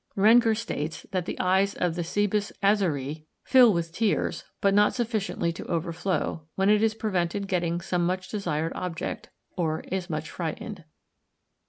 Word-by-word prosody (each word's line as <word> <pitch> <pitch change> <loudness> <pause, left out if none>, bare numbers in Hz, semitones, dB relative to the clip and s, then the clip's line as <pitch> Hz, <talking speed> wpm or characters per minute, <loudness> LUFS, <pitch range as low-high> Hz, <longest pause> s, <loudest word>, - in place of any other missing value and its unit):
Rengger 225 +2 +6
states 160 -9 -4
that 185 -2 -2
the - - -4
eyes 190 +2 +2
of 175 -2 0
the 175 +1 -2
Cebus 205 +3 0
azaræ 160 -8 +1 0.2
fill 250 -4 +7
with 170 -3 -1
tears, 220 +1 0
but 200 0 +3
not 205 +1 +4
sufficiently 215 -8 -1
to - - -8
overflow, 170 -1 -1
when 195 +2 +3
it 210 0 +4
is 220 0 +2
prevented 195 -2 -1
getting 175 -2 0
some 175 0 -1
much 185 +1 -1
desired 165 -6 -2
object, 180 -3 -4 0.3
or 160 -3 -1
is 190 -1 -4
much 155 0 -4
frightened. 175 +2 -5
185 Hz, 155 wpm, -27 LUFS, 170-205 Hz, 0.3 s, fill